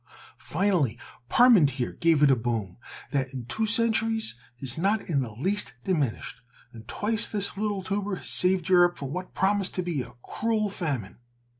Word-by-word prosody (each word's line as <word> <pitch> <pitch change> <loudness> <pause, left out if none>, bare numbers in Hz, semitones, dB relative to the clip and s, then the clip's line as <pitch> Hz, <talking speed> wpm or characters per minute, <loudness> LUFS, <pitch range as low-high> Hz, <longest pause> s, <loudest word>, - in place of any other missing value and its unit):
Finally 165 - 0 0.3
Parmentier 155 - +4
gave 165 -3 +2
it 140 - +6
a - - +5
boom 115 -6 -3 0.3
that 135 -2 -1
in 125 -3 -6
two 220 - -2
centuries 225 - +2 0.3
has 130 -2 -2
not 200 +6 0
in 145 -5 +1
the 115 -4 -5
least 190 - -1
diminished, 150 -11 -2 0.3
and 110 -1 -12
twice 220 +1 0
this 200 -2 +1
little 205 -1 -2
tuber 200 +1 -2
has - - -8
saved 180 -1 +2
Europe 175 -1 +4
from 140 0 -6
what 180 +1 -6
promised 195 0 0
to 185 - -1
be 170 -6 -2
a 125 - -10
cruel 220 -2 -1
famine." 140 - -4
180 Hz, 165 wpm, -26 LUFS, 135-205 Hz, 0.3 s, it